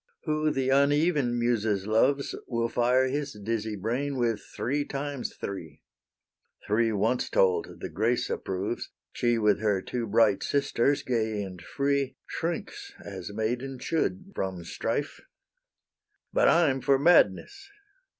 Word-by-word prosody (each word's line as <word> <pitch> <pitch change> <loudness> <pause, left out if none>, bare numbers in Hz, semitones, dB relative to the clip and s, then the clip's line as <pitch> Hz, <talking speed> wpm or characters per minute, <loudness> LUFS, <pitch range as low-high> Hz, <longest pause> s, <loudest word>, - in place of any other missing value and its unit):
Who 155 -1 +1
the 135 -3 0
uneven 140 -1 +3
Muses 110 -5 0
loves, 130 +6 +2
Will 115 -2 -1
fire 125 +2 +3
his 140 +1 -2
dizzy 110 +1 -3
brain 125 +8 -2
with 115 -3 0
three 145 +4 -2
times 140 -2 -4
three; 85 -6 -7 0.8
Three 115 +2 +2
once 110 +4 0
told 95 -2 +1
the - - -3
Grace 115 +4 0
approves; 95 +5 -3 0.2
She 120 -1 +1
with 105 -2 +3
her 105 -3 +1
two 120 +4 -4
bright 105 -1 +3
sisters, 140 -1 +1
gay 110 -4 -1
and 90 -3 -8
free, 140 +5 -1
Shrinks, 400 - -4
as 95 -1 -7
maiden 120 +5 -2
should, 185 +7 -2
from 95 - -3
strife: 115 - -3 1.1
But - - +4
I'm 145 -6 +4
for 135 +1 +4
madness. 285 - +3
120 Hz, 130 wpm, -28 LUFS, 105-140 Hz, 1.1 s, But